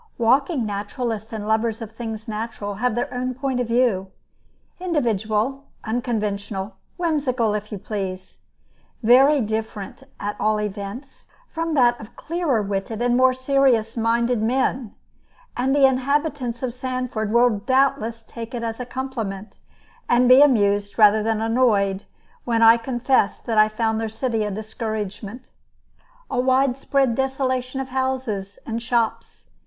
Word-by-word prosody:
Walking 260 +3 +2
naturalists 215 +2 -4
and 215 -2 -5
lovers 220 0 +1
of 225 -2 -7
things 225 -1 -6
natural 215 -2 -4
have 220 +3 -1
their 240 - -2
own 255 0 -2
point 265 -1 -2
of 245 - -1
view, 230 -5 +1 0.7
individual, 255 - -1 0.2
unconventional, 210 -4 -3 0.2
whimsical, 275 - 0
if 210 0 -4
you 205 - -4
please, 190 -2 -6 0.6
very 270 +5 +6
different, 220 -2 -4 0.2
at 205 +1 -3
all 215 0 +1
events, 210 +6 -6 0.2
from 330 -1 -2
that 240 -3 +4
of 220 0 -12
clearer 305 -9 -1
witted 200 +2 -3
and 240 0 +2
more 255 0 +4
serious 260 -4 +2
minded 235 0 +1
men; 250 0 0 0.6
and 265 +3 +1
the 280 -1 +6
inhabitants 265 -2 0
of 250 -2 -2
Sanford 255 -4 -3
will 235 -2 +3
doubtless 260 -1 +1
take 230 +2 -8
it 235 - -4
as 225 0 -4
a 250 - -5
compliment, 225 -7 -5 0.5
and 245 +1 +4
be 255 +2 +8
amused 205 -7 +3
rather 215 -1 +6
than 220 0 0
annoyed, 220 -4 +1 0.4
when 230 -1 +1
I 225 +1 +8
confess 240 -1 +1
that 225 -2 -1
I 215 0 +6
found 220 0 -1
their 225 - -2
city 225 -1 -1
a - - -2
discouragement, 215 +2 -5 0.8
a - - -2
widespread 265 0 +2
desolation 260 0 -1
of 265 0 -4
houses 255 -7 -2
and 230 0 -3
shops. 230 -1 -2
235 Hz, 140 wpm, -22 LUFS, 215-260 Hz, 0.8 s, be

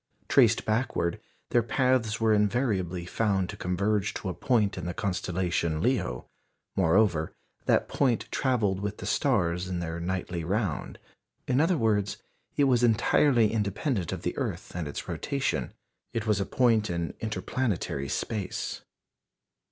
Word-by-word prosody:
_ - - -36
Traced 115 -5 +4
backward, 110 -6 0 0.3
their 120 - +4
paths 120 -2 +1
were 110 -1 +3
invariably 105 -5 +1
found 95 -1 0
to - - -5
converge 100 +3 0
to 95 - -3
a - - -2
point 105 +1 +1
in 90 -2 -5
the 90 - -4
constellation 90 -5 -1
Leo. 125 +9 0 0.5
Moreover, 85 -2 +2 0.3
that - - +3
point 125 -5 +1
travelled 110 -8 +1
with 105 +1 -3
the - - -7
stars 90 -10 +1
in 90 -1 -3
their 85 -1 -3
nightly 90 -1 -3
round. 95 -2 -2 0.5
In 130 +2 +3
other 165 +2 +3
words, 105 -4 +1 0.4
it 145 - +4
was 125 -3 +4
entirely 120 0 +4
independent 105 - -1
of - - -5
the - - -2
earth - - -3
and 85 -4 -3
its 70 - -6
rotation. 130 - -2 0.4
It 115 -2 -2
was 105 -2 +2
a 100 - -1
point 115 -4 +3
in 85 -3 -2
inter 105 -4 -3
planetary 90 - -2
space. 105 -4 -3
105 Hz, 150 wpm, -28 LUFS, 90-120 Hz, 0.5 s, Traced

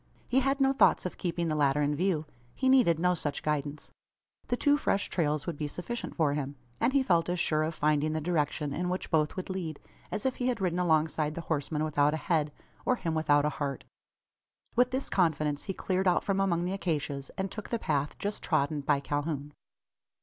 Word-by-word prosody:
He 260 - +3
had 275 +1 +1
no 270 0 +4
thoughts 270 - +4
of 180 - -5
keeping 170 -2 -1
the 155 - 0
latter 145 -1 +2
in 145 +1 +1
view. 165 -2 0 0.3
He 260 - +1
needed 245 -12 +5
no 180 +2 +2
such 150 -4 -3
guidance. 150 -1 -2 0.6
The 245 - 0
two 290 +2 +4
fresh 205 -8 0
trails 150 -4 0
would 170 -4 -4
be 150 - -2
sufficient 180 +11 -5
for 155 -4 +2
him; 145 -1 -3 0.2
and 245 - +2
he 275 0 +3
felt 170 -7 +2
as 175 0 0
sure 155 -3 +2
of 155 +1 -1
finding 150 0 +1
the 155 - 0
direction 150 -3 -1
in 180 +4 -1
which 185 +1 -3
both 155 -2 +2
would 185 - -4
lead, 170 -5 -4 0.3
as 210 - -3
if 260 - 0
he 250 - -1
had 250 - 0
ridden 180 -2 0
alongside 155 -3 +1
the 170 - -4
horseman 155 -1 -1
without 150 -1 +2
a 155 - -6
head, 155 -5 +1 0.3
or 255 - +2
him 170 -8 -3
without 145 -2 +3
a - - +3
heart. 140 -1 -2 0.9
With 245 +1 +4
this 260 +2 -2
confidence 155 -5 +1
he 195 - -2
cleared 190 0 0
out 180 - +3
from 195 -1 0
among 175 -3 +1
the 185 - -1
acacias, 145 -7 -2
and 190 0 -2
took 215 - -7
the 235 - 0
path 145 -7 -1
just 205 +1 -3
trodden 150 -1 +1
by 140 0 +1
Calhoun. 145 0 -3
160 Hz, 215 wpm, -29 LUFS, 150-190 Hz, 0.9 s, needed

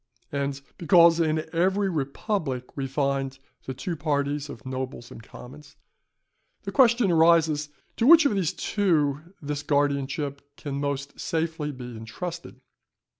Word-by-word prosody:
And 140 -1 -2 0.2
because 170 -1 +6
in 155 -1 0
every 190 +4 +2
republic 140 - -3
we 135 -1 -3
find 135 -1 -1 0.3
the 130 - -5
two 165 +7 -4
parties 145 -1 -1
of 110 - -10
nobles 130 -2 -5
and - - -10
commons, 140 +6 -13 0.9
the - - -5
question 235 -6 +4
arises, 160 -2 +4 0.3
to 235 - +2
which 325 0 +8
of 280 - +3
these 190 -6 0
two 150 -8 0 0.2
this 145 0 -3
guardianship 140 -1 -1 0.2
can 140 -2 -5
most 140 0 -4
safely 160 -2 -2
be 125 -3 -9
entrusted. 130 +5 -7
145 Hz, 130 wpm, -26 LUFS, 135-170 Hz, 0.9 s, which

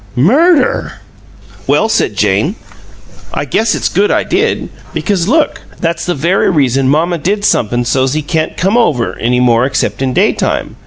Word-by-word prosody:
"Murder!" 275 - +2 0.7
"Well," - - +2
said - - 0
Jane, - - +1 0.8
"I - - -2
guess 225 0 0
it's - - -1
good 200 +3 +1
I - - +1
did, 415 +6 -1 0.3
because 190 -4 -1
look 305 +6 +1 0.2
that's 170 0 -2
the 175 - 0
very 170 +7 +1
reason 135 -5 +1
mamma 165 +4 +1
did 205 +6 -1
somep'm 120 - +1
so's 130 +1 0
he 155 0 -2
can't 160 0 -2
come 195 +6 +1 0.4
any 125 +2 +1
more 120 -1 +3
except 130 0 -1
in 130 -1 0
daytime. - - 0
165 Hz, 155 wpm, -13 LUFS, 130-205 Hz, 0.8 s, more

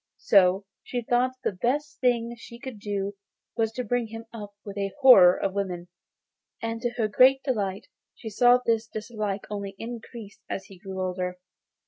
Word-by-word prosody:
So 195 0 +4 0.2
she 245 -1 -4
thought 245 +2 +2
the - - +1
best 290 +10 -2
thing 235 -2 +1
she 235 0 -12
could 255 -3 -8
do 200 -1 -3 0.4
was 225 -2 +1
to 250 - -3
bring 245 0 -1
him 225 +1 -8
up 205 -3 -8
with 200 -1 -7
a 200 -1 -2
horror 190 -10 +8
of 195 - -1
women; 180 -3 -3 0.7
and, 230 0 -4
to 240 - 0
her 225 -3 +2
great 260 +5 +5
delight, 200 -8 -2 0.3
she - - -10
saw 245 +3 +6
this 225 -1 +1
dislike 215 -2 -4
only 200 -1 -5
increased 230 -2 -9
as 190 - -4
he 195 -2 -15
grew 190 -1 -5
older. 180 0 -3
215 Hz, 170 wpm, -26 LUFS, 195-240 Hz, 0.7 s, horror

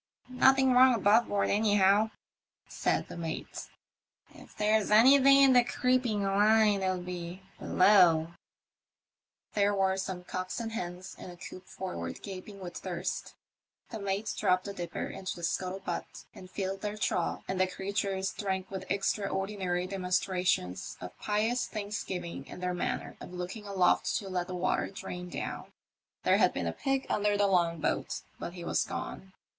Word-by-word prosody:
"Nothing 265 +1 +4
wrong 255 0 +7
above 220 +2 +4
board 200 -1 0
anyhow," 205 0 +4 0.6
said - - -1
the - - -9
mate; 165 -2 -5 0.3
" - - -41
if - - -19
there's 215 0 +2
anything 270 +5 +7
in 270 -1 +6
the 245 -1 +6
creeping 245 -4 +1
line 205 +1 +4
it'll 185 -1 0
be 180 +1 -6 0.2
below." 175 -5 +5 1.2
There 205 0 +2
were 190 -1 +2
some 190 -1 -4
cocks 185 +4 -4
and 225 -1 -4
hens 180 -3 -6
in - - -8
a 175 - -11
coop 185 +1 -10
forward 85 - -6
gaping 195 +1 -8
with 175 -1 -7
thirst. 180 -1 -4 0.6
The 220 - -5
mate 200 +2 -2
dropped 185 0 +1
the 200 - -5
dipper 175 -3 -4
into 195 0 -5
the 175 - -10
scuttle 185 +3 -2
butt - - -5
and 185 - -12
flUed 195 0 -3
their 210 0 -3
trough, 180 -4 -1
and 190 0 -1
the 185 - +3
crea 190 +2 -5
tures 195 -2 -1
drank 190 -2 -3
with 190 -1 -6
extraordinary 195 -2 -1
demonstrations 180 - -1
of 90 0 -8
pious 220 +4 0
thanksgiving 190 -8 -5
in - - -9
their 180 0 -1
manner 175 - -3
of - - -9
looking 180 +4 -6
aloft 190 -3 +2
to 195 - -3
let 180 -1 -2
the 185 - -5
water 180 +1 0
drain 180 -2 -7
down. - - -5 0.5
There - - +4
had - - +4
been - - -3
a - - -1
pig 270 -1 -1
under 205 0 +1
the 205 - +3
long 170 -4 +2
boat, - - -1 0.2
but 170 - -5
he 175 -2 -8
was - - +1
gone. 190 0 -6
195 Hz, 165 wpm, -30 LUFS, 180-210 Hz, 1.2 s, wrong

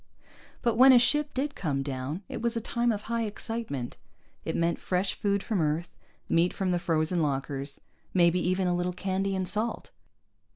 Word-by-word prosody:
But 235 -2 +1
when 265 +2 +9
a - - +8
ship 295 +4 +3
did 285 +2 -2
come 140 - -2
down, 140 +6 -4
it - - -5
was 235 0 0
a - - +1
time 235 +1 0
of 210 -1 -3
high 230 0 -1
excitement. 210 - -4 0.5
It - - -3
meant 170 0 +1
fresh 185 +1 0
food 200 -2 0
from 205 -6 0
Earth, 155 +3 -1 0.3
meat 170 +2 +2
from 190 -2 -1
the 175 - +1
frozen 165 +1 0
lockers, 140 -1 -2 0.3
maybe 175 -1 +4
even 185 +2 +1
a 175 - +1
little 175 +1 -1
candy 195 +1 -1
and 185 -1 -1
salt. 220 +4 -2
185 Hz, 180 wpm, -28 LUFS, 165-225 Hz, 0.5 s, when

